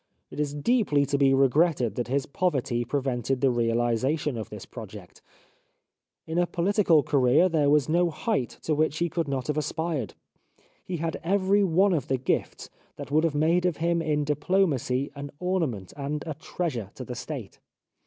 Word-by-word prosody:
It - - -8
is 145 -1 -1
deeply 150 - +2
to 140 - 0
be 135 -1 +5
regretted 135 - +3
that 120 +1 -3
his 135 +2 0
poverty 140 -7 -1
prevented 130 -1 -1
the 135 0 +3
reahsation 120 +5 0
of 110 -1 -5
this 105 -3 -9
project. 105 -5 -11 1.0
In 160 +2 -1
a 175 - +2
pohtical 175 -4 +2
career 140 +5 +4
there 155 -5 +2
was 145 -2 +3
no 170 +2 +2
height 155 - -2
to 155 - 0
which 155 0 +1
he 170 +1 0
could 165 -1 -2
not 135 -2 -2
have 150 0 -2
aspired. 155 - -3 0.7
He 180 - -4
had 165 0 -3
every 195 +3 +2
one 190 +2 +3
of 150 -7 -1
the 135 - +1
gifts 130 - -2 0.3
that - - -8
would 155 +2 +3
have 165 -3 0
made 170 +4 +2
of 175 - -2
him 170 +1 +1
in 150 -2 0
diplomacy 145 -4 0
an 145 0 -7
ornament 160 - -2
and 145 +1 -4
a 160 - -3
treasure 145 - -4
to - - -7
the - - -6
State. - - -7
150 Hz, 175 wpm, -26 LUFS, 130-170 Hz, 1.0 s, be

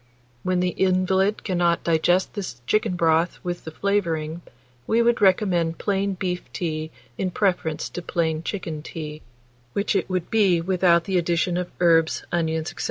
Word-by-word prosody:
When 185 +3 0
the 180 - +2
invalid 190 +2 +1
cannot 175 -3 +1
digest 170 +3 +2
this 185 - -5
chicken 215 - +1
broth 165 0 +2
with 175 -1 -4
the - - -4
flavouring, 165 -3 -1 0.5
we 225 - +2
would 235 -1 +2
recommend 185 -4 +3
plain 200 -1 -1
beef 180 -1 -4
tea 155 -2 -3 0.3
in 190 - 0
preference 180 -5 0
to 175 - -6
plain 160 -2 -1
chicken 165 -4 -4
tea, 155 -1 -7 0.5
which 200 +1 0
it 195 - 0
would 185 -2 -2
be 195 -6 +4
without 175 -1 +3
the 190 0 +1
addition 170 +1 0
of 180 0 -2
herbs, 165 -2 +3
onions, 160 -1 -1
&c. - - -17
175 Hz, 160 wpm, -24 LUFS, 165-190 Hz, 0.5 s, be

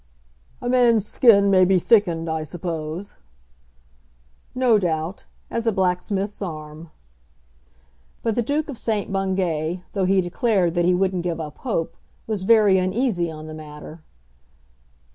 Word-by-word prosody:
"A - - -2
man's 240 -4 +3
skin 200 -4 +5
may 185 -1 +5
be 185 +1 +4
thickened, 175 -4 +2
I 160 -1 -2
suppose." 165 +3 -5 1.4
"No 250 -4 +3
doubt; 165 0 -3 0.3
as 230 0 -2
a - - +4
blacksmith's 190 +2 -1
arm." 155 -2 -7 1.3
But 225 - +1
the 240 - 0
Duke 290 +6 -1
of 280 -6 -7
St. 215 -4 -2
Bungay, 185 -3 -1
though 195 -2 0
he 190 +1 +3
declared 185 -1 +1
that 175 -1 +1
he 180 0 +3
wouldn't 185 -1 0
give 170 -1 -3
up 150 -2 -7
hope, 215 -11 -2 0.3
was 215 -3 -3
very 205 -2 +5
uneasy 185 -2 0
on 155 -1 -8
the 155 - -8
matter. 155 +1 -10
185 Hz, 140 wpm, -22 LUFS, 165-215 Hz, 1.4 s, skin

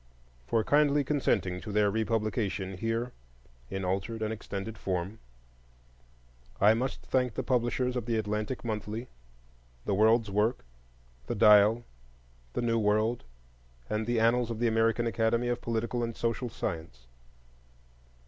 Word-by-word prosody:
For 115 +6 +2
kindly 145 +2 +3
consenting 100 - 0
to 105 - -6
their 105 0 +3
republication 110 -3 -1
here, 115 +5 -2 0.6
in 95 -1 -3
altered 100 +5 -2
and 110 0 -1
extended 105 0 -6
form, 95 +1 -3 1.4
I 105 +2 +6
must 125 +4 -2
thank 125 -3 0
the - - -2
publishers 125 0 0
of 120 -2 -3
the 115 -1 +1
Atlantic 105 +3 -2
Monthly, 110 +2 -4 0.8
The 100 - 0
World's 110 +1 +3
Work, 105 - +1 0.6
the - - -2
Dial, 105 +3 +6 0.7
The - - -1
New 115 -1 +2
World, 110 - +1 0.7
and 110 +1 -1
the 120 -1 +1
Annals 115 +1 +3
of 115 - -3
the 120 +1 +1
American 115 +1 +2
Academy 115 +1 +1
of 120 0 -1
Political 115 +1 -2
and 115 -1 -3
Social 115 +1 -1
Science. 80 - -5
110 Hz, 135 wpm, -29 LUFS, 105-120 Hz, 1.4 s, I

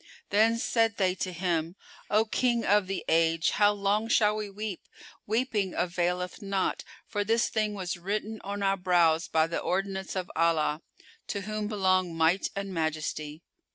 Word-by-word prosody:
Then 220 +3 +4
said 225 -1 +1
they 185 -2 +2
to 185 0 -3
him, 170 -1 -1 0.3
"O 215 +1 +3
King 235 +1 +1
of 205 -1 +3
the 195 -1 -4
Age, 165 0 +3
how 205 0 +4
long 205 +2 0
shall 210 -2 +3
we 210 -1 -4
weep? 205 -1 -6 0.4
Weeping 215 -4 0
availeth 180 +2 -1
not; 195 -2 -1 0.2
for 205 - -2
this 225 +3 +2
thing 215 -2 -1
was 180 -3 -3
written 210 +4 -3
on 200 +1 -4
our 195 0 +2
brows 170 -3 +3
by 160 0 +3
the 165 - -3
ordinance 190 +1 -2
of 185 -1 -3
Allah, 160 -2 +2 0.5
to 200 - -3
whom 215 +1 -3
belong 185 -4 +1
Might 165 +4 +2
and 200 -1 -4
Majesty. 155 -1 -3
195 Hz, 160 wpm, -28 LUFS, 175-210 Hz, 0.5 s, Then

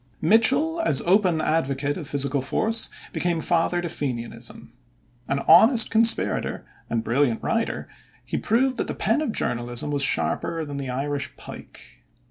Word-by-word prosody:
Mitchel, 265 - +3
as 140 -4 +3
open 180 -3 +2
advocate 145 -3 -1
of 160 -5 -7
physical 140 -1 -1
force, 225 - +1 0.2
became 175 -2 -1
father 175 +1 0
to 175 - -4
Fenianism. 125 -7 -5 0.5
An 140 0 -1
honest 220 - +7
conspirator 225 +1 +1 0.2
and 115 -1 -2
brilliant 120 0 0
writer, 230 0 -2 0.4
he - - -5
proved 255 +4 0
that - - -2
the - - -4
pen 300 - 0
of 300 - -2
journalism 120 - -1
was 145 -1 -1
sharper 160 +3 -1
than 145 -1 -7
the 135 -2 -5
Irish 140 +1 -4
pike. - - -12
155 Hz, 145 wpm, -23 LUFS, 140-220 Hz, 0.5 s, honest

